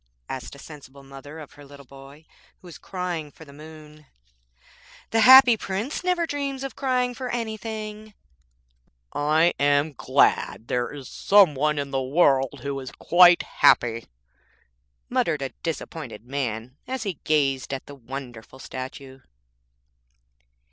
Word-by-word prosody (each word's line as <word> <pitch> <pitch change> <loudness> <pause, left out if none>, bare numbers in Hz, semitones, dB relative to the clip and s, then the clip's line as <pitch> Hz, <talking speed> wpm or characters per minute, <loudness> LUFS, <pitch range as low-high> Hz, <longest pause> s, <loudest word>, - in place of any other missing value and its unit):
asked 130 +1 -7
a - - -13
sensible 140 -2 -13
mother 135 +3 -11
of 155 -3 -11
her 145 - -15
little 140 0 -14
boy 135 +4 -15 0.3
who - - -21
was 170 - -12
crying 180 -5 -5
for 160 - -15
the 140 - -15
moon. 155 0 -14 1.0
'The 225 - +2
Happy 255 +1 +9
Prince 210 - -4
never 360 -2 +1
dreams 280 -3 -4
of 270 - -6
crying 250 -2 0
for 255 0 -6
anything.' 215 -2 -5 1.0
'I 155 +4 +2
am 145 +2 +2
glad 115 -2 +1
there 120 -1 -1
is 140 -3 -9
some 195 -6 +4
one 150 +2 0
in 140 -1 -3
the 135 -1 -1
world 135 -2 +2
who 140 -1 -3
is 130 -1 -8
quite 175 0 +5
happy', 115 -1 +2 1.0
muttered 155 - 0
a 135 - -3
disappointed 150 -8 -6
man 125 -1 -4
as 260 -2 -4
he 195 -7 -4
gazed 140 -4 0
at 135 -1 -5
the 145 - -11
wonderful 130 -2 -9
statue. 130 +1 -9
150 Hz, 140 wpm, -24 LUFS, 135-200 Hz, 1.0 s, Happy